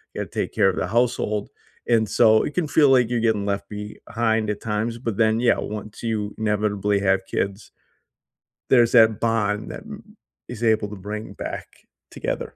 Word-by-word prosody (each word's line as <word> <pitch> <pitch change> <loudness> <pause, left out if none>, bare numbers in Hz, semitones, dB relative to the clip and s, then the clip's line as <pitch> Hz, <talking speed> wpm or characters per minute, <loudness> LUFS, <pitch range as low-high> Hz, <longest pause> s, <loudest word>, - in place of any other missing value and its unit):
gotta - - -3
take - - -3
care 95 - +4
of 95 - -3
the - - -1
household." 115 -1 0 0.4
And 115 -2 +3
so, 110 +2 +5
it 145 - -4
can 175 -1 0
feel 145 -1 +4
like 125 -3 +4
you're 120 -1 0
getting 110 -3 +1
left 100 -1 -2
behind 110 +1 -2
at 105 -1 -3
times, 110 +2 -2
but 115 -4 -3
then, 110 0 +3
yeah, 120 - +3
once 105 0 -6
you 105 -3 -2
inevitably 105 -1 0
have 95 -1 +1
kids 100 +2 -3 1.0
there's 120 -3 +5
that 110 -3 +6
bond 110 -2 0
that, - - -8
m 210 0 -12 0.3
is 120 -1 -7
able 110 -2 +2
to 105 - -7
bring 105 +3 -7
back - - -6 0.4
together. - - -4
110 Hz, 175 wpm, -23 LUFS, 105-115 Hz, 1.0 s, that